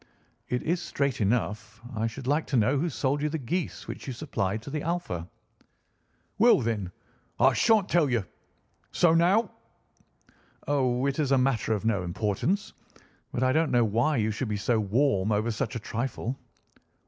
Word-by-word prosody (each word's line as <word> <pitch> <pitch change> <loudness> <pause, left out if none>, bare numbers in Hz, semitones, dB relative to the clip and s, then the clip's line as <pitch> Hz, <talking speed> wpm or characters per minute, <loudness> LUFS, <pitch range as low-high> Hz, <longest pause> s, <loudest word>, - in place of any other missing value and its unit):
"It 125 - -1
is 170 +2 0
straight 140 -7 -1
enough. 110 0 -1 0.2
I 110 +1 0
should 125 +3 -7
like 145 +4 +1
to 135 - +1
know 125 +6 +3
who 170 +4 0
sold 140 0 -1
you 150 - 0
the 160 - -2
geese 165 +6 -3
which - - -7
you 130 - -3
supplied 110 -6 -2
to 140 - -8
the 150 0 -2
Alpha." 150 - -3 1.1
"Well 235 +2 +6
then, 110 -6 -2 0.5
I - - +5
shan't 220 -4 +3
tell 160 -4 +3
you. 115 -6 0 0.7
So 170 -2 +4
now!" 185 +7 +3 1.2
"Oh, 130 -3 +1
it 140 +2 -1
is 145 -3 +1
a - - +5
matter 125 -4 +1
of 105 0 -3
no 105 -4 +1
importance; 105 - -1 0.6
but 125 - -1
I 130 - +3
don't 160 -1 +2
know 120 -2 +3
why 120 +8 +1
you 110 -1 +1
should 110 +2 -3
be 105 - -1
so 110 +3 +1
warm 105 -1 +1
over 110 +3 +1
such 115 +3 -3
a - - -2
trifle." 120 +3 -3
125 Hz, 175 wpm, -27 LUFS, 110-150 Hz, 1.2 s, Well